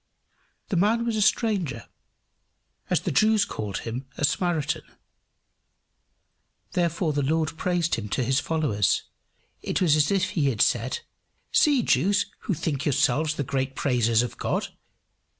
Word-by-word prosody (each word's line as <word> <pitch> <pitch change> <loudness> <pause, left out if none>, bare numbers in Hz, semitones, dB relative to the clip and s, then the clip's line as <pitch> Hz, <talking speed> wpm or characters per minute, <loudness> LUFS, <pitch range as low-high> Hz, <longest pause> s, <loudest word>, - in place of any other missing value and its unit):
This 180 - +1
man 225 +5 +2
was 230 -2 -1
a 215 - 0
stranger, 195 - 0 1.0
as - - +2
the - - -2
Jews 215 +4 +3
called 105 - -5
him, 125 +4 -5
a 145 - +2
Samaritan. 170 -2 0 1.9
Therefore 170 -2 0
the 145 - 0
Lord 155 +2 0
praised 175 -1 0
him 105 -2 -2
to 130 - 0
his 130 +2 +2
followers. 145 - 0 0.6
It - - -2
was 165 -5 +4
as 150 -1 +3
if 195 -2 +1
he 150 -4 +1
had 115 -6 -1
said, 470 - 0 0.5
"See, 285 -5 +4
Jews, 195 +9 +2
who 195 - -2
think 145 -2 -2
yourselves 150 +2 +1
the 145 - -2
great 135 -1 -2
praisers 120 -3 +2
of 120 - -6
God! - - -1
155 Hz, 145 wpm, -25 LUFS, 130-185 Hz, 1.9 s, was